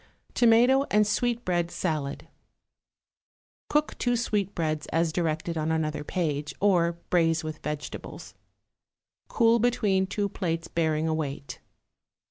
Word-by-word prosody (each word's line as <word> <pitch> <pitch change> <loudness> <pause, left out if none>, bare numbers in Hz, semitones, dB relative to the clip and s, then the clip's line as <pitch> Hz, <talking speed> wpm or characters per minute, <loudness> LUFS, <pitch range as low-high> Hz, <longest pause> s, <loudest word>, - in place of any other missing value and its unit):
=Tomato 245 +4 +5
and 210 0 +4
Sweetbread 210 -6 0
Salad.= 155 -6 -3 1.4
Cook 300 0 +1
two 245 -1 +1
sweetbreads 190 -9 -1
as 165 0 +1
directed 165 -1 -1
on 155 +1 -1
another 155 -2 -1
page, 150 -4 -2
or 175 -4 +3 0.2
braise 165 -2 +2
with 155 0 -5
vegetables. 150 -1 -6 0.9
Cool 230 0 +3
between 205 -5 +2
two 205 +1 -1
plates 165 -3 -3
bearing 160 -1 0
a 160 - +1
weight. 140 -4 -4
170 Hz, 110 wpm, -27 LUFS, 155-210 Hz, 1.4 s, =Tomato